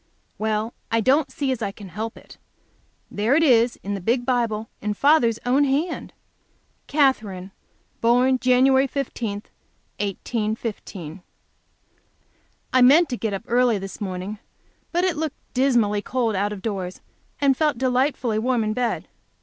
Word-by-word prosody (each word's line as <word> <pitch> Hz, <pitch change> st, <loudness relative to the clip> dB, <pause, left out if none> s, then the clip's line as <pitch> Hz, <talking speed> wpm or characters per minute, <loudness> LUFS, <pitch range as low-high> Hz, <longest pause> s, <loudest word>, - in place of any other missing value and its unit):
Well, 220 Hz, +1 st, -1 dB, 0.2 s
I 230 Hz, -, +2 dB
don't 270 Hz, +6 st, +2 dB
see 275 Hz, -2 st, -1 dB
as 255 Hz, -, -3 dB
I 200 Hz, -, -1 dB
can 195 Hz, -1 st, -11 dB
help 220 Hz, +5 st, -5 dB
it. -, -, -15 dB, 0.7 s
There 220 Hz, +6 st, +1 dB
it 325 Hz, -, +4 dB
is 240 Hz, -4 st, +4 dB
in 200 Hz, -, -3 dB
the 200 Hz, -, -4 dB
big 240 Hz, +6 st, 0 dB
Bible 230 Hz, -4 st, 0 dB
in 210 Hz, 0 st, -2 dB
father's 260 Hz, -4 st, +4 dB
own 260 Hz, +4 st, +3 dB
hand: 290 Hz, +5 st, -1 dB, 0.8 s
"Katherine, 215 Hz, -10 st, +1 dB, 0.5 s
born 250 Hz, +3 st, +3 dB
Jan. 255 Hz, 0 st, +4 dB, 0.2 s
15, 250 Hz, -5 st, -3 dB, 0.7 s
1815." 205 Hz, -4 st, -4 dB, 1.5 s
I 255 Hz, -, +5 dB
meant 290 Hz, +7 st, +6 dB
to 250 Hz, -, -2 dB
get 220 Hz, -4 st, -2 dB
up 195 Hz, -, -6 dB
early 240 Hz, -2 st, +3 dB
this 195 Hz, +1 st, -8 dB
morning, 190 Hz, +1 st, -4 dB, 0.5 s
but 350 Hz, +1 st, +1 dB
it 370 Hz, -4 st, +1 dB
looked 315 Hz, -2 st, -3 dB, 0.2 s
dismally 240 Hz, -6 st, +2 dB
cold 235 Hz, -2 st, -1 dB
out 200 Hz, +2 st, 0 dB
of 200 Hz, -2 st, -7 dB
doors, 190 Hz, -5 st, -4 dB, 0.4 s
and 275 Hz, -2 st, +3 dB
felt 300 Hz, -2 st, +1 dB
delightfully 255 Hz, -3 st, +1 dB
warm 245 Hz, 0 st, +1 dB
in 215 Hz, 0 st, -1 dB
bed. 240 Hz, 0 st, -2 dB
235 Hz, 145 wpm, -23 LUFS, 210-260 Hz, 1.5 s, meant